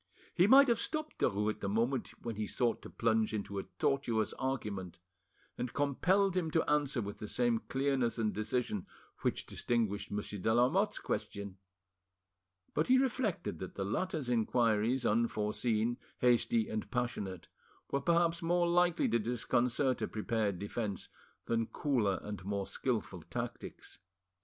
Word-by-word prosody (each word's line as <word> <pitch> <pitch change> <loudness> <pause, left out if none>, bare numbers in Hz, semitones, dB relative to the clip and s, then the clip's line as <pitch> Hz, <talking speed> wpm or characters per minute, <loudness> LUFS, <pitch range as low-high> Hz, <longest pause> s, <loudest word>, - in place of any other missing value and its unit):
He 180 +2 +4
might 275 +4 +8
have 235 -2 +3
stopped 310 -1 -1
Derues 105 +2 +2
at - - -9
the 100 - -2
moment 120 +6 +1 0.2
when 115 -2 -3
he 105 0 -2
sought 120 +2 0
to - - -9
plunge 110 -1 +1
into 100 -1 -3
a - - -5
tortuous 120 -6 +1
argument, 105 -9 -3 0.6
and 125 - -3
compelled 180 +7 +2
him 175 -3 0
to 160 +1 +1
answer 145 -5 +1
with 100 0 -6
the 105 - -5
same 120 0 +1
clearness 135 -3 +1
and 110 -2 0
decision 110 -2 -2 0.3
which - - -1
distinguished 110 -4 -1
Monsieur 105 0 -4
de 110 - +1
Lamotte's 170 - +3
question; 100 -2 -4 1.1
but 155 - +1
he 260 - +6
reflected 250 - 0
that 95 - -7
the 95 - -2
latter's 155 - -2
inquiries, 115 +1 +2
unforeseen, 115 +1 +1 0.2
hasty, 170 - +3
and 225 -2 -4
passionate, 105 -7 -3 0.4
were 140 - +1
perhaps 170 +1 +2
more 175 +1 +2
likely 175 0 +3
to 115 - +2
disconcert 125 +3 +1
a - - 0
prepared 105 -2 -1
defence 100 0 -4 0.4
than 115 -1 0
cooler 115 -10 +1
and 105 -2 -6
more 100 0 -2
skilful - - -2
tactics. - - -6
120 Hz, 145 wpm, -33 LUFS, 105-150 Hz, 1.1 s, might